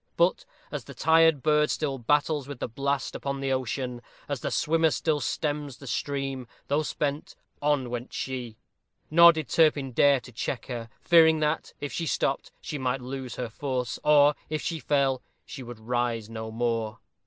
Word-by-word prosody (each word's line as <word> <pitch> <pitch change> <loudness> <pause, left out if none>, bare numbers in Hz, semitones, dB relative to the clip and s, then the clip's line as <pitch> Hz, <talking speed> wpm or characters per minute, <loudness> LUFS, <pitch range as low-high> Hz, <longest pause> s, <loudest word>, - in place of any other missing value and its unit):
But, 170 +2 +2 0.3
as 145 -5 -5
the 140 - -11
tired 160 -1 +4
bird 150 -1 +3
still 140 -4 -1
battles 145 +3 +1
with 140 -2 -7
the - - -3
blast 140 +4 -2
upon 140 0 -3
the 135 0 -1
ocean, 125 -1 -3 0.3
as - - -3
the - - -2
swimmer 165 +1 +2
still 155 0 0
stems 145 -3 -2
the 140 - -12
stream, 135 0 -3 0.2
though 145 +2 +2
spent, 145 0 -3 0.3
on 145 -3 +1
went 120 +1 -5
she: 125 -4 -5 0.5
nor 170 +2 +9
did 160 -3 -4
Turpin 145 -5 +3
dare 140 +2 +4
to 125 - -13
check 120 +1 -4
her, 120 -3 -6
fearing 160 -2 +6
that, 150 +1 -1
if 145 - -5
she 165 - -2
stopped, - - -1
she 150 - -5
might 130 0 -1
lose 130 0 -6
her 120 -2 -4
force, 125 -2 -3
or, 145 -1 +6 0.2
if 155 0 -2
she 165 -2 -2
fell, 135 -3 +1 0.2
she 135 - -8
would 120 -2 -8
rise 115 -1 -2
no 110 0 -5
more. 115 -1 -1
140 Hz, 175 wpm, -27 LUFS, 125-150 Hz, 0.5 s, nor